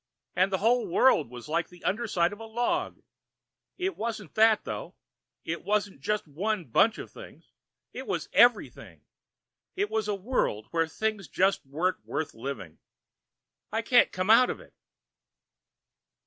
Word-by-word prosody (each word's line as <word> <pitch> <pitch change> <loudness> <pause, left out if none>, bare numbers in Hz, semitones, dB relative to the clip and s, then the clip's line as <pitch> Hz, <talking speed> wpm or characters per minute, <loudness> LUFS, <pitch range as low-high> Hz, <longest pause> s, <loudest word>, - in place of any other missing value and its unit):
And 185 +2 +2
the 190 - +1
whole 235 +5 +2
world 170 - +3
was 125 +1 -10
like 165 +2 0
the 175 0 -17
underside 200 -5 0
of 205 - -10
a 225 - -8
log. 245 +11 -2 0.7
It 380 +1 -2
wasn't 215 -5 -5
that, 220 -1 +4
though. - - -6 0.5
It 170 +1 -4
wasn't 200 -6 -1
just 210 +4 -1
one 190 +5 -2
bunch 205 - +3
of - - -8
things. - - -13 0.4
It - - -7
was - - -2
everything. - - +3 0.7
It 405 +2 -1
was 220 -2 -1
a 210 - 0
world 195 - -1
where 165 -1 +1
things 215 +1 -3
just 190 +7 +1
weren't 165 +7 -1
worth 160 - -4
living. 115 - -7 0.9
I 225 +2 -1
can't 245 +1 +4
come 185 +3 +1
out 250 +3 +7
of - - -4
it...." - - -17
205 Hz, 150 wpm, -28 LUFS, 170-225 Hz, 0.9 s, out